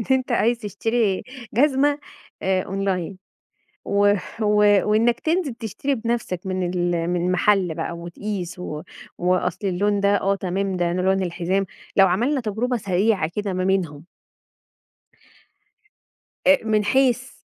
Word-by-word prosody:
إن 225 - -3
أنت 260 -1 +2
عايز 235 0 +2
تشتري 220 -1 -1 0.3
جزمة 285 +2 +3 0.4
أونلاين، 190 -1 -1 0.7
و 205 0 +3 0.3
و 210 -1 +2 0.4
وإنّك 230 +2 +3
تنزل 320 -6 0
تشتري 240 +5 -3
بنفسك 230 -6 -2
من 185 -1 -1
ال 175 -1 0
من 180 +1 0
محل 185 -2 +2
بقى - - -3
وتقيس 180 +1 -5
و 155 -4 -5 0.4
وأصل 180 +2 0
اللون 200 +3 +1
ده 200 0 +3
آه، 195 +1 +1
تمام 190 +1 -2
ده 175 -1 0
لون 190 +1 +1
الحزام، 180 +2 -1 0.3
لو 195 -1 +7
عملنا 245 +10 +1
تجربة 235 +3 -1
سريعة 195 -4 +1
كده 205 -2 -2
ما 185 0 -1
بينهم 170 -6 -1 2.4
أ 285 0 +7
من 215 -2 +1
حيث 260 +2 +2
195 Hz, 125 wpm, -23 LUFS, 180-230 Hz, 2.4 s, لو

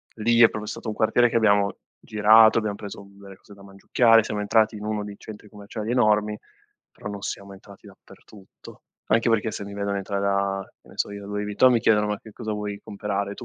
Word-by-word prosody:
lì 115 +2 +2
è 115 - +8
proprio 105 0 -7
stato 110 +1 -6
un - - -3
quartiere 120 +2 +3
che - - -6
abbiamo 100 -3 +2 0.2
girato, 110 +1 +5
abbiam 105 -2 -1
preso, 100 0 -9
uhm, 100 0 -18
delle 100 -1 -12
cose 100 - -17
da 100 - -17
mangiucchiare, 115 +4 +3
siamo 105 -1 -4
entrati 110 +1 +2
in 105 - -8
1 105 -1 -3
dei 105 -1 -8
centri 105 -1 -12
commerciali 105 +2 -7
enormi, 105 -3 +2 0.5
però - - -10
non 100 -1 -7
siamo 100 0 -6
entrati 100 0 -16
dappertutto. 100 -3 -17 0.3
Anche 115 +1 +3
perché 110 0 +1
se 105 - -6
mi 100 - -9
vedono 100 0 -3
entrare 100 0 -3
da, 100 -1 -1
che - - -24
ne - - -17
so - - -1
io, 100 0 -8
Luis 105 0 -3
Vuitton, 105 +5 +3
mi 120 - +3
chiedono: 105 -3 +3
“Ma 105 -1 -2
che 110 - -14
cosa 110 +1 -5
vuoi 105 -1 -5
comperare, 100 -1 -4
tu?” - - -11
105 Hz, 225 wpm, -24 LUFS, 100-110 Hz, 0.5 s, è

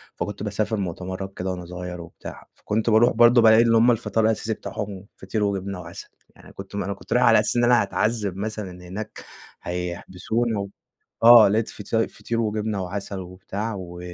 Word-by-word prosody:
فكنت 105 0 -5
باسافر 105 +1 -1
مؤتمرات 95 +1 -5
كده 95 +1 -2
وأنا 90 -1 -6
صغير 90 0 -7
وبتاع، 85 - -11
فكنت 110 +2 -1
باروح 110 +2 +5
برضه 120 +1 +6
بالاقي 110 0 +7
إن 115 -1 +3
هم 115 +2 +5
الفطار 115 -1 0
الأساسي 110 0 0
بتاعهم 100 -2 -7
فطير 110 -2 -3
وجبنة 100 -2 -2
وعسل، 85 0 -10 0.3
يعني - - -16
كنت 95 +1 -10
ما 100 -3 -2
أنا 100 - -2
كنت - - -6
رايح - - +4
على - - +6
أساس - - 0
إن 120 - +3
أنا 120 -1 +5
هاتعذب 105 -4 -1
مثلًا 105 -2 -4 0.2
هناك 105 +4 -7 0.4
هيحبسونا 90 +6 -3
و 100 - -4 0.6
آه 115 -3 +9
لاقيت 110 +2 0
فط 105 - -11 0.2
فطير 115 0 -3
وجبنة 105 -2 -2
وعسل 95 +1 -5
وبتاع، 95 +4 -5
و 90 -1 -8
100 Hz, 180 wpm, -23 LUFS, 95-110 Hz, 0.6 s, آه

